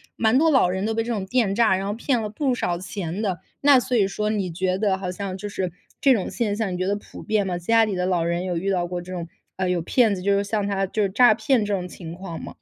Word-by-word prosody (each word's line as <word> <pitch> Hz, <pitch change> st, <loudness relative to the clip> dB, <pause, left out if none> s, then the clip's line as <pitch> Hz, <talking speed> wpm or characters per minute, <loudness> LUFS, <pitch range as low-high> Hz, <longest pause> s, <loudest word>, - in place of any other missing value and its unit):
蛮 225 Hz, +3 st, +3 dB
多 325 Hz, +2 st, +4 dB
老 260 Hz, -, +4 dB
人 190 Hz, +3 st, -2 dB
都 225 Hz, -, 0 dB
被 225 Hz, 0 st, 0 dB
这 235 Hz, -, -4 dB
种 205 Hz, -4 st, -2 dB
电 220 Hz, -2 st, +1 dB
诈， 225 Hz, -4 st, +4 dB
然 195 Hz, +1 st, -3 dB
后 205 Hz, -, -1 dB
骗 240 Hz, +1 st, 0 dB
了 210 Hz, -, -3 dB
不 260 Hz, +4 st, 0 dB
少 175 Hz, -6 st, -1 dB
钱 180 Hz, +1 st, -5 dB
的。 190 Hz, -5 st, -1 dB, 0.3 s
那 280 Hz, -3 st, +8 dB
所 250 Hz, 0 st, -2 dB
以 200 Hz, -4 st, +4 dB
说 210 Hz, +2 st, -2 dB
你 195 Hz, -5 st, -1 dB
觉 185 Hz, +2 st, -1 dB
得 195 Hz, -2 st, +1 dB
好 190 Hz, -1 st, -4 dB
像 190 Hz, 0 st, -5 dB
就 205 Hz, -, -6 dB
是 190 Hz, -3 st, -3 dB, 0.3 s
这 270 Hz, -2 st, +6 dB
种 205 Hz, -, -1 dB
现 220 Hz, -4 st, -1 dB
象， 210 Hz, -4 st, -2 dB
你 -, -, -3 dB
觉 185 Hz, -, -1 dB
得 200 Hz, +1 st, +1 dB
普 -, -, -11 dB
遍 210 Hz, -2 st, 0 dB
吗？ 180 Hz, -1 st, -2 dB
家 225 Hz, +6 st, +3 dB
里 205 Hz, -3 st, -2 dB
的 180 Hz, 0 st, -1 dB
老 180 Hz, -3 st, +1 dB
人 170 Hz, +1 st, -1 dB
有 180 Hz, -2 st, -2 dB
遇 195 Hz, +4 st, -2 dB
到 180 Hz, -3 st, +1 dB
过 175 Hz, 0 st, -4 dB
这 185 Hz, +1 st, -8 dB
种， 170 Hz, -2 st, -5 dB, 0.3 s
呃， 185 Hz, -1 st, -1 dB
有 180 Hz, -2 st, 0 dB
骗 225 Hz, +4 st, +3 dB
子 180 Hz, -, -4 dB
就 200 Hz, +1 st, +2 dB
是 200 Hz, -, +1 dB
像 205 Hz, -1 st, -1 dB
他 195 Hz, -1 st, 0 dB
就 210 Hz, +3 st, -2 dB
是 195 Hz, -, +1 dB
诈 230 Hz, +2 st, +6 dB
骗 225 Hz, +1 st, +1 dB
这 205 Hz, -, -1 dB
种 180 Hz, -2 st, -2 dB
情 170 Hz, -2 st, -9 dB
况 175 Hz, -2 st, -7 dB
吗？ -, -, -7 dB
195 Hz, 320 characters per minute, -23 LUFS, 180-220 Hz, 0.3 s, 那